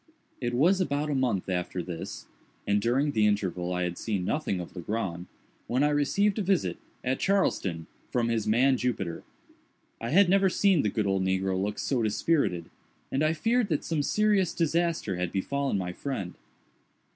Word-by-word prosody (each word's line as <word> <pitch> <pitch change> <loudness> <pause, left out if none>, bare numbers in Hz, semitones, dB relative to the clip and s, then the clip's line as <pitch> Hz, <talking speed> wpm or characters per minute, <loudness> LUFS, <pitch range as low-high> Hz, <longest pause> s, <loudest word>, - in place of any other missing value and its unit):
It 120 -1 -1
was 180 +9 +4
about 150 -2 -1
a - - +1
month 125 -8 0
after 90 -1 -2
this 85 -2 -6 0.4
(and 100 0 +2
during 130 +6 +1
the 110 -5 +3
interval 90 -4 -1
I 90 0 0
had 90 -1 -3
seen 100 -5 -2
nothing 125 -7 -1
of 90 - -8
Legrand) 90 -1 -3 0.4
when 125 +4 +1
I 150 - +4
received 195 +9 +1
a - - +1
visit, 190 -2 +1 0.3
at 130 +1 0
Charleston, 95 - 0 0.2
from 120 -2 0
his 115 -2 -1
man, 130 +5 +4
Jupiter. 95 -10 -2 0.8
I 115 - -3
had 190 +7 +5
never 195 +1 +4
seen 190 -3 +3
the 105 - +1
good 105 +1 -1
old 95 -1 +1
negro 95 0 0
look 100 +3 -2
so 130 -4 0
dispirited, 105 - 0 0.4
and 135 - 0
I 155 +1 +3
feared 230 +7 +1
that 155 -5 -1
some 160 -3 -1
serious 205 +3 +2
disaster 165 - 0
had 90 -1 -2
befallen 140 +5 -1
my 90 -2 -3
friend. 100 -7 -4
120 Hz, 175 wpm, -28 LUFS, 95-155 Hz, 0.8 s, had